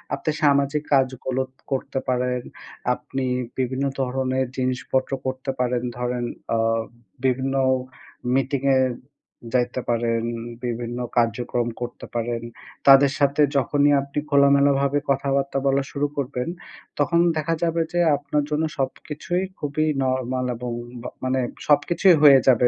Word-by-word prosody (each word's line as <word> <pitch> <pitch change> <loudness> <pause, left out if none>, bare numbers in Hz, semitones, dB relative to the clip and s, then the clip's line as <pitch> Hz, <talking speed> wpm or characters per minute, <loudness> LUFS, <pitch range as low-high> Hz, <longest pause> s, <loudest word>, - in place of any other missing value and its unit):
আপনি 155 - -2
সামাজিক 140 +1 +3
কাজগুলো 130 -1 +1 0.3
করতে 135 0 -2
পারেন। 125 0 0 0.5
আপনি 135 -1 -4 0.3
বিভিন্ন 130 +1 -1 0.2
ধরনের 130 0 0
জিনিসপত্র 130 +1 -1
করতে 130 +1 -2
পারেন। 125 -1 0
ধরেন 125 0 -2 0.3
আ - - +2 0.7
বিভিন্ন 130 +1 +1 0.8
মিটিং 135 0 +1 0.2
এ - - +4 0.7
যাইতে 125 0 +1
পারেন 115 -1 +1 0.4
বিভিন্ন 120 0 -3 0.2
কার্যক্রম 120 +1 +1
করতে 120 0 -6
পারেন। 115 0 -1 0.5
তাদের 135 0 +8
সাথে 140 +1 +3 0.2
যখনই 145 +2 +3
আপনি 140 +1 -4
খোলামেলা 140 0 +5
ভাবে 140 +1 +1
কথাবার্তা 140 0 0
বলা 135 0 +2
শুরু 145 0 0
করবেন, 125 -2 -2 0.5
তখন 170 +4 +2 0.2
দেখা 155 +2 0
যাবে 165 0 +1
যে 175 - +1 0.2
আপনার 145 +1 -1
জন্য 150 +1 0
সবকিছুই 150 +6 -2 0.2
খুবই 150 +2 -1 0.2
নরমাল 130 -1 -1
এবং 120 +1 -5 0.3
বা 125 - -5
মানে 130 +1 +1 0.3
সবকিছুই 170 +4 +4
হয়ে 140 -3 +9
যাবে 125 -1 +6
130 Hz, 125 wpm, -23 LUFS, 125-140 Hz, 0.8 s, হয়ে